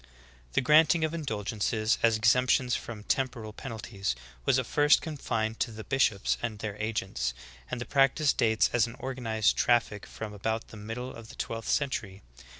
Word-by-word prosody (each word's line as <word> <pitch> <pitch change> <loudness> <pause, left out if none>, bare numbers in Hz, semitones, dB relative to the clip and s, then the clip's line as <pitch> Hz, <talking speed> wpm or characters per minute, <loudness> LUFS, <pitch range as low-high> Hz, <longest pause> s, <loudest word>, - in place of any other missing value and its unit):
13. - - -25 0.4
The - - +3
granting 155 +4 +5
of 155 0 0
indulgences 110 -6 -1
as 115 -1 +4
exemptions 125 +2 +3
from 110 -3 -6
temporal 115 -4 -2
penalties 100 - -4 0.3
was 130 - +4
at 130 - 0
first 145 +4 +4
confined 115 -8 -3
to - - 0
the 110 -1 -8
bishops 110 -7 +1
and 115 -3 -3
their 105 -1 -5
agents, 95 - -2 0.3
and - - -3
the 120 - -4
practice 140 +1 +3
dates 110 -3 +2
as 120 -1 +3
an 115 - -9
organized 120 -5 0
traffic 115 -4 +1
from 105 -1 -7
about 110 +2 -3
the - - -11
middle 115 +5 -6
of 115 -1 -11
the 130 - -11
twelfth 115 -1 -4
century. 105 -9 -1
115 Hz, 170 wpm, -29 LUFS, 110-130 Hz, 0.4 s, granting